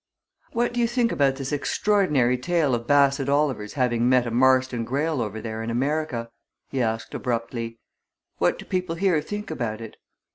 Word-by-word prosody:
"What 240 +1 0
do 245 - -2
you 235 - +3
think 240 0 +1
about 135 -2 +2
this 135 0 -5
extraordinary 145 -4 +2
story 175 +3 +1
of 120 0 -2
Bassett 140 -1 +3
Oliver's 140 -8 0
having 120 -2 +1
met 125 -1 +4
a 120 - -3
Marston 130 0 +3
Greyle 140 +4 -1
over 110 -1 -3
there 110 0 -5
in 115 - -4
America?" 125 -1 -1 0.4
he 135 - 0
asked 115 -1 -2
abruptly. 115 -1 -3 0.6
"What - - +2
do - - -10
people 180 -3 -2
here 175 -3 +2
think 210 +7 -6
about 110 -2 -3
it?" 115 -2 -9
130 Hz, 175 wpm, -24 LUFS, 115-155 Hz, 0.6 s, met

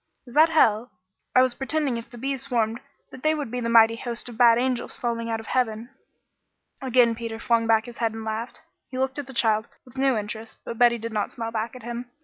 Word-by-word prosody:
Is 245 - -13
that 310 +3 +6
hell? 235 -7 +3 0.5
I 255 - +7
was 255 -1 +1
pretending 280 0 -1
if 230 0 -7
the 240 - -12
bees 270 +2 -2
swarmed 235 -4 0 0.3
that 260 - -11
they 310 +2 +2
would 290 -7 -4
be 250 - -2
the 230 -1 -2
mighty 230 0 +6
host 240 0 -6
of 240 - -9
bad 230 -1 +6
angels 250 0 -1
falling 230 -1 -2
out 225 0 -1
of 225 - -10
heaven." 235 0 -1 0.9
Again 250 -3 +4
Peter 230 -1 -5
flung 230 0 +1
back 220 -1 +3
his 240 -1 -11
head 225 -2 0
and 225 0 -6
laughed. 220 +2 -4 0.3
He 255 - -6
looked 265 +2 -1
at 285 - -6
the - - -8
child 220 -3 +1 0.2
with 255 +1 -11
new 270 -3 +3
interest, 220 +1 -6
but 230 - -6
Betty 240 -1 +5
did 230 0 -6
not 210 -1 -1
smile 230 -1 -5
back 225 +1 -3
at 250 - -11
him. 240 +1 -6
235 Hz, 235 wpm, -25 LUFS, 225-255 Hz, 0.9 s, I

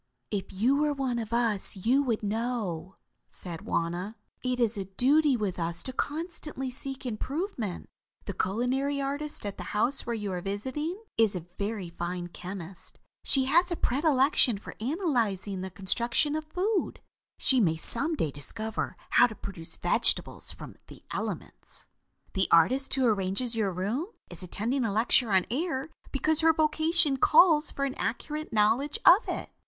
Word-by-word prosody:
"If 200 -2 -3
you 240 +9 +2
were 300 0 +2
one 260 -4 -1
of 220 -1 -5
us 230 -5 0
you 240 +9 +2
would 235 -6 -1
know," 210 -5 -3 0.3
said 170 -3 -8
Wauna. 175 +6 -2 0.3
"It 255 -1 -1
is 235 -2 +2
a 195 -2 -4
duty 270 +8 +3
with 200 -5 -3
us 170 0 -1
to 260 - -1
constantly 300 -3 -4
seek 270 +1 -2
improvement. 250 - -4 0.4
The 200 - -4
culinary 250 +10 -1
artist 285 -1 -4
at 200 - -5
the - - -6
house 250 +6 +2
where 235 - -1
you 210 -3 -4
are 180 -1 -3
visiting, 265 - -4 0.2
is 220 -3 +4
a 175 -2 -5
very 200 -4 -3
fine 175 +1 -4
chemist. 180 0 -9 0.3
She 270 -2 +6
has 345 +7 +3
a 345 - -1
predilection 270 -5 +3
for 195 - -10
analyzing 230 - -1
the 190 - -4
construction 235 - +1
of 310 0 -3
food. 390 +3 -1 0.4
She 260 - +5
may 165 -7 +2
some 275 - -2
day 160 - -1
discover 220 +10 -5
how 245 - +6
to 220 - -9
produce 185 -6 -6
vegetables - - +2
from - - -11
the - - -14
elements. - - -6 0.5
"The 190 -2 +1
artist 255 +12 +4
who 265 -1 +2
arranges 215 +2 0
your 210 -4 0
room 205 - -2 0.2
is - - -10
attending 230 +9 -2
a 225 - 0
lecture 225 +2 +3
on 190 -2 +4
air 300 +1 -2 0.2
because 310 +3 +2
her 325 0 +5
vocation 315 -1 +2
calls 315 +2 +5
for 275 - -2
an 270 - -2
accurate 300 +6 -3
knowledge 225 +7 +2
of 380 +6 +7
it. - - -4
240 Hz, 160 wpm, -28 LUFS, 195-285 Hz, 0.5 s, of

